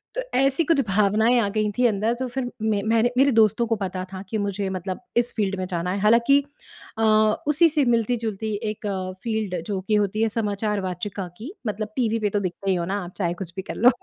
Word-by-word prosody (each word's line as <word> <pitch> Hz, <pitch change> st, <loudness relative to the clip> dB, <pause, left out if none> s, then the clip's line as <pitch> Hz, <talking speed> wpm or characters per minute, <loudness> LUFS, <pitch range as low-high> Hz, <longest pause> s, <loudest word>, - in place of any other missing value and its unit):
तो -, -, -1 dB, 0.2 s
ऐसी 275 Hz, +4 st, +3 dB
कुछ 300 Hz, -3 st, +3 dB
भावनाएँ 210 Hz, +5 st, +3 dB
आ 205 Hz, -, +1 dB
गई 215 Hz, 0 st, 0 dB
थीं 250 Hz, -1 st, +4 dB
अंदर, 215 Hz, +2 st, 0 dB
तो 260 Hz, +1 st, -3 dB
फिर 245 Hz, 0 st, -4 dB
में 215 Hz, -2 st, +1 dB
मैंने 225 Hz, +2 st, +2 dB
मेरे 275 Hz, +1 st, +5 dB
दोस्तों 220 Hz, +2 st, +4 dB
को 225 Hz, -, +1 dB
पता 185 Hz, -2 st, -3 dB
था 190 Hz, -, -5 dB
कि 220 Hz, -, -1 dB
मुझे 200 Hz, -1 st, -2 dB
मतलब 185 Hz, +1 st, -4 dB, 0.2 s
इस 240 Hz, 0 st, +2 dB
फ़ील्ड 200 Hz, -3 st, 0 dB
में 185 Hz, -, -2 dB
जाना 180 Hz, -1 st, -2 dB
है। 195 Hz, -, -2 dB
हालांकि 235 Hz, +6 st, +5 dB, 0.6 s
अ, -, -, +1 dB, 0.4 s
उसी 310 Hz, +3 st, +5 dB
से 300 Hz, -2 st, +1 dB
मिलती-जुलती 225 Hz, -2 st, 0 dB, 0.2 s
एक 215 Hz, 0 st, -7 dB, 0.4 s
फ़ील्ड 220 Hz, -6 st, -2 dB
जो 200 Hz, -2 st, -2 dB
कि 215 Hz, -, +3 dB
होती 210 Hz, +1 st, +1 dB
है 225 Hz, -, +2 dB
समाचार 210 Hz, -1 st, -1 dB
वाचिका 185 Hz, +1 st, -4 dB
की, 255 Hz, -, -8 dB
मतलब 210 Hz, +1 st, -3 dB
टीवी 230 Hz, -3 st, +1 dB
पे 210 Hz, -1 st, 0 dB
तो 205 Hz, -, 0 dB
दिखते 195 Hz, +1 st, -3 dB
ही -, -, +2 dB
हो 170 Hz, -, -2 dB
ना 195 Hz, +2 st, -2 dB
आप, 175 Hz, -, -10 dB
चाहे 175 Hz, -4 st, 0 dB
कुछ 175 Hz, -, -12 dB
भी -, -, -1 dB
कर -, -, -6 dB
लो। 240 Hz, -, +6 dB
215 Hz, 225 wpm, -24 LUFS, 195-235 Hz, 0.6 s, लो